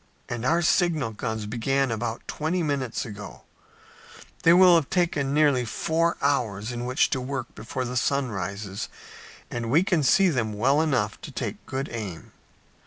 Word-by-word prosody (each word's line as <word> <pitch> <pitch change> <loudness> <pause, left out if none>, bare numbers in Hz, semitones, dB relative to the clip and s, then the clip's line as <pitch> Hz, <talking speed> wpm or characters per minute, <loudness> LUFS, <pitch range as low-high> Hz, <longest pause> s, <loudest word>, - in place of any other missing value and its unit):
"And 120 -1 -4
our 170 +5 +2
signal 160 -8 +2
guns 110 0 -4
began 130 +4 0
about 115 +1 -4
twenty 165 +4 -1
minutes 140 -6 -2
ago. 105 -3 -9 1.0
They 165 - +6
will 180 +1 +7
have 175 +3 +1
nearly 140 -2 +2
four 165 +8 0
hours 115 -6 0
in 120 0 -4
which 125 +1 +2
to 130 - 0
work 130 -1 -4
before 130 -1 -4
the 125 +1 -4
sun 135 0 +1
rises 100 +1 -4 0.6
and 115 -1 -3
we 155 +8 +4
can 175 -4 +1
see 185 +7 +4
them 115 -8 -1
well 135 +8 +3
enough 125 -10 0
to - - -8
take - - -5
good 135 +2 -3
aim." 105 -8 -6
130 Hz, 160 wpm, -25 LUFS, 110-155 Hz, 1.0 s, will